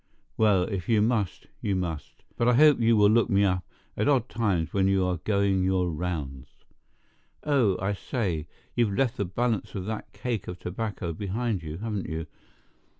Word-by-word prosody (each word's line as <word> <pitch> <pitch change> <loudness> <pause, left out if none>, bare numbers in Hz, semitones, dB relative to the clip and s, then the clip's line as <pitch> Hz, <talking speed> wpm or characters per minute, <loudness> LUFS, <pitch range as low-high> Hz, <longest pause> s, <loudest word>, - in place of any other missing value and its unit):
Well, 105 -4 +4
if 95 -1 -4
you 110 -2 +4
must, 105 -4 0 0.2
you 100 - 0
must; 85 -5 -5
but 120 - +1
I 125 - +5
hope 150 0 +6
you 115 -1 +4
will 105 0 +6
look 115 +1 +3
me 100 +1 +3
up 90 -1 +1 0.3
at - - 0
odd 130 -4 +2
times 95 -9 0
when 95 -1 +2
you 95 -1 +2
are 90 -1 0
going 100 +1 +1
your 90 -2 +1
rounds. 75 -6 -5 0.8
Oh, 130 -10 +2
I 95 +2 0
say, 95 - -2 0.3
you've 110 -5 +1
left 130 -4 +1
the 100 - 0
balance 110 +3 -1
of 95 -2 -4
that 110 +1 -5
cake 120 -6 -3
of 90 - -5
tobacco 90 -2 -4
behind 105 +3 -2
you, 80 -1 -6
haven't 105 -1 -3
you? 80 0 -3
100 Hz, 180 wpm, -27 LUFS, 90-115 Hz, 0.8 s, hope